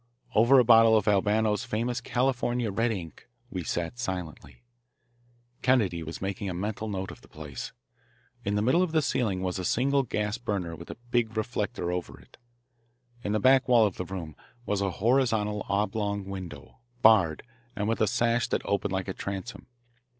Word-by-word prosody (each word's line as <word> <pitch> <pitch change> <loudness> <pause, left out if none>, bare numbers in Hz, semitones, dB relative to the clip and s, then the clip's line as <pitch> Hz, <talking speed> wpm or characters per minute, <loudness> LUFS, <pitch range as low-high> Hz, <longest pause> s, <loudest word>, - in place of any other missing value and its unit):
Over 120 +5 +6
a 125 - +7
bottle 115 -1 +7
of 105 - -1
Albano's 105 +2 +2
famous 120 +1 -2
California 125 -2 0
"red 115 +4 +1
ink" 85 -7 -7 0.2
we 90 -2 -3
sat 85 +8 -3
silently. 90 -7 -6 1.0
Kennedy 110 -10 +2
was 80 +3 -6
making 100 0 -3
a 90 - -4
mental 105 +4 -3
note 95 -2 -4
of - - -13
the - - -18
place. 75 -4 -8 0.7
In 100 +1 -1
the 105 - +1
middle 130 +10 +3
of 180 -3 0
the 155 -1 +3
ceiling 105 -8 0
was 90 0 -2
a - - -3
single 135 +8 +2
gas 105 -3 -2
burner 100 -8 -3
with - - -11
a - - -7
big 115 -3 +1
reflector 105 -5 -2
over, 90 -1 -4
it. - - -20 0.9
In 105 - -1
the 110 - +2
back 130 +4 +5
wall 120 -3 +6
of 100 - -2
the 90 - -3
room 85 -5 -6 0.3
was 100 -1 -1
a 100 - +1
horizontal 110 0 +1
oblong 100 0 -1
window, 95 - -8 0.2
barred, 95 -9 +5 0.3
and 105 0 -2
with 115 - 0
a 110 - +4
sash 115 +3 +1
that - - -2
opened 100 -1 -1
like 95 0 -2
a 95 - -3
transom. 100 +5 -6
105 Hz, 180 wpm, -28 LUFS, 95-120 Hz, 1.0 s, a